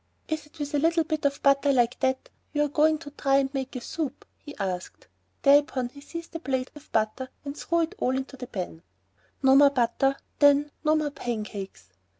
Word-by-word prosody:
"Is 315 -1 -3
it 300 - -21
with 290 -1 -4
a 290 - +2
little 330 +2 +3
bit 310 -1 -3
of 280 0 0
butter 280 0 +4
like 245 -2 +2
that 260 -1 -1 0.2
you're 295 -1 +1
going 310 +2 +3
to 295 -2 -10
try 275 -1 +1
and 270 0 0
make 265 -1 -4
a 255 - -4
soup?" 305 +3 -4
he 295 - -11
asked. 185 -3 -4 0.4
Thereupon 280 -3 +4
he 280 +3 -14
seized 335 +3 -8
the 330 - -5
plate 260 -4 -2
with 295 0 -13
the - - -29
butter 220 +4 -1 0.2
and 280 0 -5
threw 335 +2 0
it 330 - -1
all 260 +1 +1
into 265 +1 -5
the 250 -1 -8
pan. 180 -7 -5 0.6
No 265 0 +6
more 285 0 +8
butter... 270 +1 +1 0.2
then... 285 0 +5
no 310 0 +4
more 305 -2 0
pancakes. 210 - -6
280 Hz, 205 wpm, -27 LUFS, 255-295 Hz, 0.6 s, more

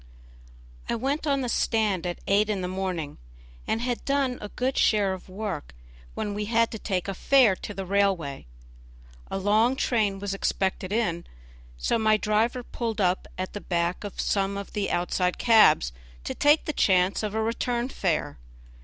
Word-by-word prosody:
I - - +1
went 275 +6 -2
on 275 -1 +2
the 250 - -2
stand 215 -7 +1
at 175 - -3
eight 205 +2 +3
in 200 -3 -1
the 180 - -2
morning, 185 -5 -4 0.5
and 225 - 0
had 245 -1 -2
done 275 -3 0
a 210 - -6
good 255 +4 -2
share 205 -3 +3
of 185 0 -9
work, 190 - -5 0.4
when 205 - -3
we 210 +1 -3
had 230 +1 +2
to 220 - -6
take 190 -3 -2
a 195 - -2
fare 245 0 +4
to - - -7
the 195 -1 -5
railway. 185 - 0 0.8
A - - -2
long 215 +6 +3
train 215 -7 +1
was 200 0 -4
just - - -2
expected 190 0 -1
in, 205 -7 -1 0.5
so 230 - 0
my 215 -1 +4
driver 220 +4 0
pulled 230 -2 -4
up 185 -1 +1
at 185 0 -4
the 205 - -5
back 170 +1 -1
of 205 - -7
some 195 0 0
of 200 - -7
the 205 -1 -1
outside 180 +1 0
cabs 215 - +5 0.3
to - - -3
take 295 +2 +3
the 305 - -2
chance 185 -4 +2
of 215 -1 -3
a 220 - +1
return 235 +2 -1
fare. 175 - -2
205 Hz, 180 wpm, -26 LUFS, 185-230 Hz, 0.8 s, cabs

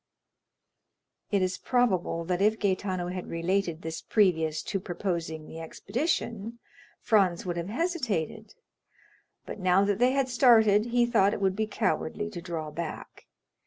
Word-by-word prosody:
It 200 -2 +2
is 185 0 -2
probable 190 -9 +1
that 180 +1 -1
if 215 +2 +3
Gaetano 185 -3 -1
had 180 0 -5
related 170 0 -1
this 160 0 -5
previous 160 -7 +1
to 195 - -2
proposing 170 -4 -4
the 160 - -9
expedition, 230 - -3 0.4
Franz 195 -6 +2
would 175 -1 -2
have 170 +2 -4
hesitated, 225 - -2 0.9
but - - -7
now 185 +1 +3
that 205 0 0
they 250 +1 +4
had 275 -1 +1
started, 230 -4 +5
he 240 0 +3
thought 215 -4 +3
it - - -5
would 190 -1 +1
be 215 +1 -1
cowardly 210 +1 -2
to 175 -4 -7
draw 165 -3 -5
back. 165 +1 -7
195 Hz, 145 wpm, -28 LUFS, 170-220 Hz, 0.9 s, started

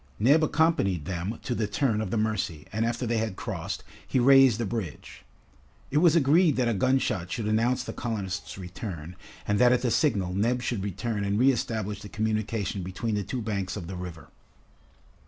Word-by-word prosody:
Neb 140 +9 +4
accompanied 145 - +2
them 95 +5 -3
to 125 - -2
the 110 -3 -1
turn 110 0 0
of 110 - -3
the 115 - -1
Mercy, 105 -8 -1
and 110 +2 +1
after 120 +1 -2
they 115 -1 0
had 110 -3 -2
crossed, - - -5 0.2
he - - 0
raised 135 -2 +6
the 115 - 0
bridge. 100 -8 -5 0.7
It 145 - +3
was 170 -1 +5
agreed 160 +1 +4
that 125 -2 +1
a 115 - +2
gunshot 100 -6 0
should 115 -3 -2
announce 115 +4 +1
the - - -6
colonists' 100 -7 -4
return, 90 -2 -7 0.3
and 105 0 +1
that 125 0 +6
at 125 0 +2
the 120 - +1
signal 100 - +1
Neb 120 +6 +1
should 115 -4 -2
return 105 +2 -3
and 100 0 0
reestablish 110 -5 +1
the 105 - -9
communication 110 -2 -2
between 95 +5 -3
the 105 - 0
two 120 +4 -4
banks 100 -3 -3
of 90 - -6
the 95 +2 -6
river. 90 -2 -8
110 Hz, 190 wpm, -27 LUFS, 95-125 Hz, 0.7 s, raised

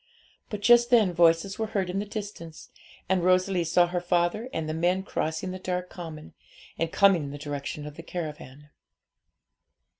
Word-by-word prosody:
But 210 -2 -5
just 240 +1 +6
then 220 -7 +4
voices 170 +4 +3
were 220 - -1
heard 190 -2 0
in 180 +2 -2
the 205 - -4
distance, 200 -6 -8 0.4
and 185 -1 +1
Rosalie 185 0 +3
saw 175 +2 +4
her 175 0 -3
father 175 +7 0
and 160 -1 -3
the 155 - -2
men 175 +4 +1
crossing 160 -1 -3
the 185 - -6
dark 180 0 -3
common, 160 -3 -9 0.5
and 165 0 -1
coming 195 -6 +4
in - - -6
the 145 - -7
direction 145 0 -5
of 150 0 -9
the - - -7
caravan. 150 -4 -7
175 Hz, 175 wpm, -27 LUFS, 160-190 Hz, 0.5 s, just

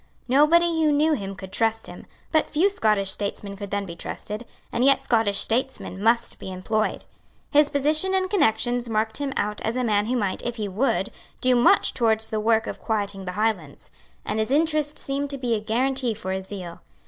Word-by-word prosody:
Nobody 320 +5 +4
who 305 - +4
knew 305 +2 +3
him 195 -7 -4
could 190 -1 -10
trust 225 +1 0
him; - - -10 0.2
but 315 - +2
few 360 +7 +2
Scottish 210 - +2
statesmen 200 0 -4
could 200 0 -7
then 200 0 -2
be 170 -3 -8
trusted; 210 +6 -6 0.3
and 235 - +1
yet 275 0 +4
Scottish 220 -6 +1
statesmen 230 -5 +1
must 230 +2 +2
be 190 - -7
employed. 215 +4 -2 0.5
His 295 0 +4
position 310 +7 +1
and 375 0 +1
connections 245 - +1
marked 220 0 -1
him 285 -1 -3
out 210 0 -2
as 225 +2 -2
a 255 - 0
man 210 -2 +1
who 250 +2 0
might, 200 -5 -1
if 240 0 -4
he 215 -3 -3
would, 210 +8 0 0.3
do 255 -1 +3
much 240 - +4
towards 220 -2 +2
the 215 - -1
work 225 +1 +2
of - - -7
quieting 200 -3 -2
the 180 - -4
Highlands; 195 -8 -2 0.3
and 215 - -2
his 220 - 0
interest 305 0 +1
seemed 280 +1 -2
to 280 - -3
be 245 -3 -1
a 220 - +1
guarantee 245 +2 0
for 190 -3 -5
his 190 0 -4
zeal. 180 -4 -8
225 Hz, 200 wpm, -24 LUFS, 205-275 Hz, 0.5 s, Nobody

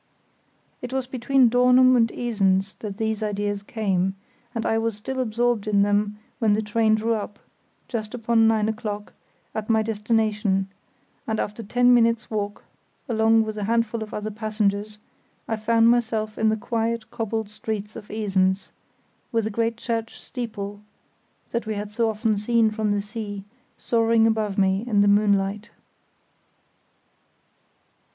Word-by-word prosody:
It 245 - -6
was 265 -1 -1
between 260 0 +3
Dornum 250 +2 +5
and 230 -2 +3
Esens 195 -4 0
that 205 -3 -6
these 220 -1 -1
ideas 205 -1 -2
came, 195 -3 -1 0.4
and 230 - -2
I 225 - +2
was 225 -1 -1
still 260 +5 -5
absorbed 235 -2 0
in 200 -1 +3
them 205 +1 +1 0.2
when 220 -3 +3
the 215 - +1
train 215 +1 +2
drew 225 +1 0
up, 210 -1 -4 0.5
just 220 -2 -4
upon 225 -1 +3
nine 220 -1 +2
o'clock, 215 -2 -4 0.4
at 215 0 -4
my 220 -1 +3
destination, 210 -3 0 0.6
and 220 -1 -1
after 210 +2 -3
ten 245 +3 +3
minutes' 230 -2 +2
walk, 205 -1 -3 0.4
along 225 -1 +3
with 215 -1 -5
a 205 - -2
handful 230 0 0
of 215 - -6
other 210 +1 -4
passengers, 210 -1 -1 0.5
I 225 - 0
found 225 +1 +3
myself 220 -3 +1
in 220 - +2
the 220 - +1
quiet 230 0 -2
cobbled 220 -1 -3
streets 210 -1 -5
of 210 -2 -10
Esens, 195 -3 0 0.6
with 230 -2 +1
the 220 - -2
great 230 +2 -1
church 230 -1 -3
steeple, 205 -5 -6 0.7
that 235 -1 -2
we 215 - -2
had 205 0 -5
so 225 +1 +1
often 215 0 0
seen 225 +1 +2
from 215 -1 -1
the 205 0 +1
sea, 205 -1 -6 0.3
soaring 230 -1 +3
above 220 -3 0
me 190 +1 +2
in 210 -4 +3
the 205 - +4
moonlight. 200 0 +2
220 Hz, 150 wpm, -24 LUFS, 205-230 Hz, 0.7 s, Dornum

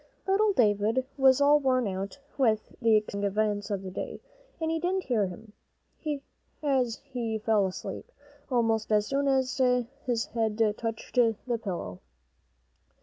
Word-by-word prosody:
Little 410 +2 +3
David 220 - +2
was 265 -1 +5
all 290 +1 +6
worn 255 -4 +2
out 195 +4 -4 0.2
with 220 -6 +1
the 225 -2 +5
exciting 210 -1 0
events 205 0 0
of 200 -2 -2
the 190 - -6
day, 185 - -5 0.4
and 320 0 -1
he 325 - 0
didn't 370 +3 0
hear 225 -8 +1
him, 205 +4 -11 1.1
as 260 -5 +1
he 240 -5 -3
fell 215 -2 +2
asleep 190 - -7 0.4
almost 225 -4 +1
as 210 -1 +3
soon 280 +4 0
as 265 -1 +1 0.5
his 235 -2 +1
head 225 -2 -2 0.2
touched 225 -1 -4
the 235 0 +1
pillow. 170 - -4
230 Hz, 145 wpm, -28 LUFS, 210-265 Hz, 1.1 s, all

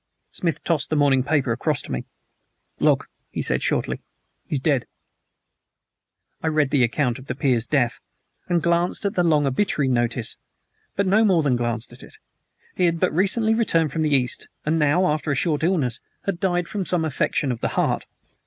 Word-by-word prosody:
Smith 170 -2 -2
tossed 165 -4 0
the 155 - 0
morning 140 -3 +4
paper 135 -2 +1
across 145 +6 0
to - - -9
me. 65 - -3 0.7
"Look," - - +2 0.2
he - - -3
said - - +1
shortly. - - -1 0.5
"He's 145 - -1
dead." 135 -3 +1 1.5
I - - -2
read 155 -3 +1
the 140 -4 +3
account 120 +1 0
of 130 - -14
the 130 - -3
peer's 125 -4 +1
death, 125 -3 +1 0.5
and 170 -3 +1
glanced 170 +3 +1
at 200 - 0
the 185 - +1
long 155 -4 +3
obituary 140 0 +1
notice; 120 -1 -1 0.6
but 200 - +1
no 205 +4 +4
more 185 -7 +3
than 135 -4 +2
glanced 120 -1 -2
at - - -14
it. - - -14 0.6
He 180 - +2
had 170 -1 +1
but - - +1
recently 210 +6 +3
returned 165 -9 +2
from 160 - -2
the 155 - +2
East, 125 -2 0 0.2
and 160 +2 +1
now, 150 +5 +3
after 155 -2 0
a 140 - +1
short 150 +2 0
illness, 155 -9 +1 0.2
had 195 -4 -2
died 175 -2 0
from 205 0 -3
some 175 -3 +1
affection 140 -2 0
of 115 - -5
the - - +1
heart. - - 0
150 Hz, 190 wpm, -23 LUFS, 130-175 Hz, 1.5 s, morning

